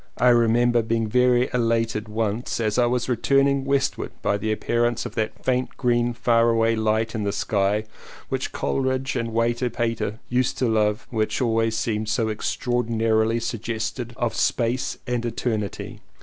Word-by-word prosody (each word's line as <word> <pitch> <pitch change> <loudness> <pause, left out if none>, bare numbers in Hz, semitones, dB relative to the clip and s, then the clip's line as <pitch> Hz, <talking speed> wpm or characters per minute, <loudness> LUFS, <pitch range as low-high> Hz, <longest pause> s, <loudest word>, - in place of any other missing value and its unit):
I 125 - +4
remember 120 0 +4
being 115 0 0
very 125 +2 +3
elated 115 -2 0
once 110 +2 -2
as 110 0 0
I 120 - +4
was 125 0 0
returning 135 +3 +2
westward 140 -1 0
by 100 - +1
the 110 +2 -1
appearance 120 +2 0
of - - -6
that 110 -1 -3
faint 125 -1 0
green 120 0 +1
faraway 115 -1 +3
light 110 +1 0
in 110 - -2
the 100 - 0
sky, 100 +1 0 0.4
which - - -3
Coleridge 130 0 -1
and 115 -2 -2
Walter 120 +2 +1
Pater 115 -2 -2
used 125 +1 0
to 125 - +1
love 110 0 +1
and 115 - -3
which 110 - 0
always 115 -2 +1
seems 110 -1 -1
so 110 -1 0
extraor 120 +3 -1
dinarily 115 0 +1
suggestive 115 +1 -4
of 120 -2 -1
Space 120 +1 0
and 125 -2 -1
Eternity. 110 -4 -3
115 Hz, 160 wpm, -24 LUFS, 110-125 Hz, 0.4 s, I